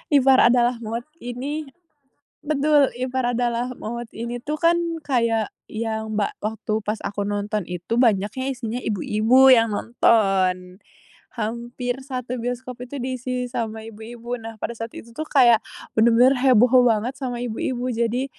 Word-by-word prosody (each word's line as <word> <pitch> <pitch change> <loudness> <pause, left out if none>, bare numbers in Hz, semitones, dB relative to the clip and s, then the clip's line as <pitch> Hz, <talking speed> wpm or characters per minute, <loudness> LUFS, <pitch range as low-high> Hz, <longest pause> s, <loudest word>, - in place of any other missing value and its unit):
Ipar 265 -1 +6
Adalah 245 0 +3
Maut 230 +2 -4 0.2
ini 275 +5 -4 0.8
betul. 290 -1 +3
Ipar 255 -1 -1
Adalah 245 +1 -1
Maut 235 +1 -6
ini 235 +2 -4
tuh 300 +4 -3
kan 340 0 +4 0.3
kayak 230 -5 +1 0.2
yang 220 -1 -4
ba 205 - 0
waktu 215 0 -2
pas 210 +1 -2
aku 200 0 -3
nonton 205 0 -2
itu 180 +6 -3
banyaknya 220 +2 +1
isinya 235 -2 -4
ibu-ibu 220 +6 +3
yang 230 -2 +3
nonton. 190 -5 +1 0.6
Hampir 235 +3 -3
satu 255 -2 -5
bioskop 245 +1 -5
itu 280 +3 -7
diisi 255 0 -3
sama 220 -1 -4
ibu-ibu. 230 +2 -7
Nah, 225 0 -8
pada 230 - -4
saat 230 +1 -5
itu 230 +1 -12
tuh 310 - -4
kayak, 240 -5 +5 0.3
bener-bener 235 +4 +5
heboh 250 0 +5
banget 235 +2 +1
sama 255 -3 -4
ibu-ibu. 245 +2 -3
Jadi, 235 +3 0
235 Hz, 140 wpm, -23 LUFS, 220-255 Hz, 0.8 s, Ipar